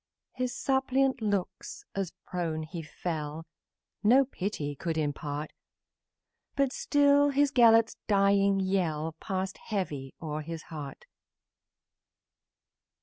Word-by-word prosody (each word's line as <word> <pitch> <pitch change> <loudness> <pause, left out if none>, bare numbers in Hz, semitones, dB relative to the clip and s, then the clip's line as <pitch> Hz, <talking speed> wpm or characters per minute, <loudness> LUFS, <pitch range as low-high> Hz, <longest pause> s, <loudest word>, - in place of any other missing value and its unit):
His 255 -1 -2
suppliant, 265 -1 +1
as 195 -2 -3
to - - -33 0.2
earth 160 -3 -2
he 170 - -4
fell, 155 0 -5 0.6
No 255 +6 +6
pity 185 - -3
could 160 +3 -3
impart, 150 0 -3 1.0
But 275 -2 +1
still 285 0 +4
his 285 0 +2
Gelert's 230 -3 +5
dying 200 -1 +4
yell 165 -5 0
Passed 190 0 -3
heavy 150 -11 -4
o'er 155 -1 -4
his 165 +1 -6
heart. 145 -3 -7
190 Hz, 100 wpm, -29 LUFS, 155-240 Hz, 1.0 s, No